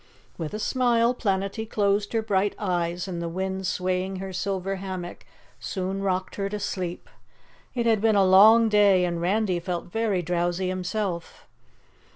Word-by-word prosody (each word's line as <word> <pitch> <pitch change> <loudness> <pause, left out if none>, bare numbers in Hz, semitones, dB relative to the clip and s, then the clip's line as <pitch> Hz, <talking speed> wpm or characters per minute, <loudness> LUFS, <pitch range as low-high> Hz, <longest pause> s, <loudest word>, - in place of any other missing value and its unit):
With 165 +2 -5
a - - -4
smile 240 +1 +2
Planetty 200 0 -2
closed 205 0 +1
her 225 -1 +1
bright 200 -1 0
eyes 175 -2 -2
and 175 -2 -4
the 170 - -3
wind 190 +2 -3
swaying 185 +1 -1
her 190 0 -6
silver 195 +1 -2
hammock 185 -2 -7 0.3
soon 190 0 -3
rocked 185 -1 -2
her 200 -1 -2
to 210 +1 -4
sleep. 180 -3 -4 0.7
It 240 -2 0
had 225 -3 +3
been 220 -1 +3
a 195 -1 +5
long 215 +5 +7
day 200 -4 +4
and 170 -1 -2
Randy 190 0 +1
felt 175 0 -5
very 215 -4 0
drowsy 175 +2 -1
himself. 185 -1 -4
190 Hz, 160 wpm, -25 LUFS, 180-210 Hz, 0.7 s, long